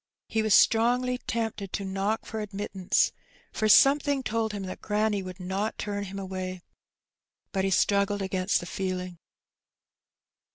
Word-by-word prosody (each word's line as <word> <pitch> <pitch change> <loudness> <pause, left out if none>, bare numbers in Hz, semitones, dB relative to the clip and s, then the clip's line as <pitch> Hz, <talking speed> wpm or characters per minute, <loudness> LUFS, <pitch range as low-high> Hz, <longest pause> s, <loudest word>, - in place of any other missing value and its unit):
He 220 - 0
was 215 -1 +4
strongly 250 +2 +3
tempted 225 -6 -3
to 200 - -2
knock 195 +3 -1
for 220 - -5
admittance, 200 -2 0 0.4
for 215 - 0
some 275 +8 +7
thing 285 -2 -1
told 225 -1 -1
him 205 -2 -5
that 185 - -7
granny 210 -1 0
would 185 0 -8
not 190 +4 -2
turn 205 -1 -3
him 195 +1 -7
away, 185 -1 -5 0.9
but 190 -1 0
he - - +1
straggled 200 +1 +2
against 190 +1 0
the - - -7
feeling. 185 -1 -4
200 Hz, 150 wpm, -27 LUFS, 190-220 Hz, 0.9 s, some